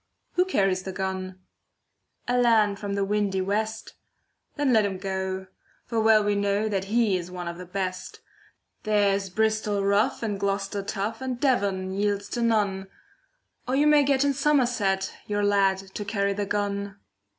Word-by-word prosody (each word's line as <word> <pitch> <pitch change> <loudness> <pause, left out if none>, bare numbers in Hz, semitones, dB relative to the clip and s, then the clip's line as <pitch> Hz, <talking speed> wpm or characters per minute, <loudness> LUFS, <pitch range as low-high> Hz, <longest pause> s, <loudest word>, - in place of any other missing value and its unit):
Who 360 - +3
carries 195 - +1
the 190 - -6
gun? 190 0 -4 0.9
A 245 - +1
lad 220 -5 +3
from 200 -1 -3
the 200 -1 0
windy 200 -1 0
west. 215 +3 -2 0.6
Then 285 -4 +1
let 220 -2 +5
him 195 -2 -2
go, 190 0 -3 0.4
for 230 -2 -1
well 220 -1 +5
we 205 0 +1
know 200 +1 0
That 195 -3 -1
he 220 -1 +2
is 175 0 -6
one 180 -1 -6
of 170 +1 -6
the 180 - -8
best. 185 - -4 0.6
There's 200 -2 +1
Bristol 215 0 0
rough, 200 +3 +2
and 205 -3 -2
Gloucester 200 0 -1
tough, 200 +4 -4
And 255 -2 -3
Devon 200 -8 0
yields 205 0 -1
to 240 - -3
none. 205 -4 +1 0.8
Or 255 - 0
you 290 +2 +3
may 300 -1 +6
get 280 -1 +2
in 280 - +2
Somerset 245 -9 +1
Your 205 0 -1
lad 200 -2 +3 0.2
to 210 - -4
carry 200 -1 0
the 205 0 -3
gun. 200 -1 -2
205 Hz, 165 wpm, -26 LUFS, 195-220 Hz, 0.9 s, may